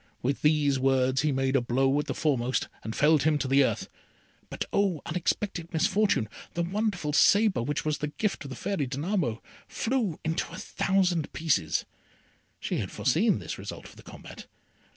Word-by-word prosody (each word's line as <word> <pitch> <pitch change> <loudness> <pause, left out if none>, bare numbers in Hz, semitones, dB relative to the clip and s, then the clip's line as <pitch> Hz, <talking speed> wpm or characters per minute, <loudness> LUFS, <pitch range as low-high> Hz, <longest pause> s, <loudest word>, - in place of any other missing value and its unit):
With 135 +2 -1
these 150 -3 +3
words 130 0 +2
he 150 0 +1
made 135 0 0
a 135 - +4
blow 135 +4 +1
at 150 - -3
the - - -3
foremost, 130 -4 0 0.2
and 110 - -5
felled 150 0 +4
him 155 0 +3
to 140 - -2
the 135 +1 +5
earth. - - -1 0.6
But - - -4
oh, 190 -7 +1
unexpected 175 0 -2
misfortune! 190 - +2 0.3
the 170 - 0
wonderful 180 -4 -1
sabre, 205 - +4
which 145 +6 -2
was 155 -1 0
the 150 - -2
gift 195 +6 -2
of 140 - -8
the 130 - -6
Fairy 155 -2 -2
Danamo, 145 - -2 0.2
flew 225 -9 -1
into 160 +1 -1
a - - -8
thousand 180 -5 0
pieces. 145 - 0 0.7
She - - -2
had 95 - -3
foreseen 155 - +2
this - - -6
result - - -7
of - - -17
the - - -14
combat. - - -11
150 Hz, 175 wpm, -28 LUFS, 135-180 Hz, 0.7 s, the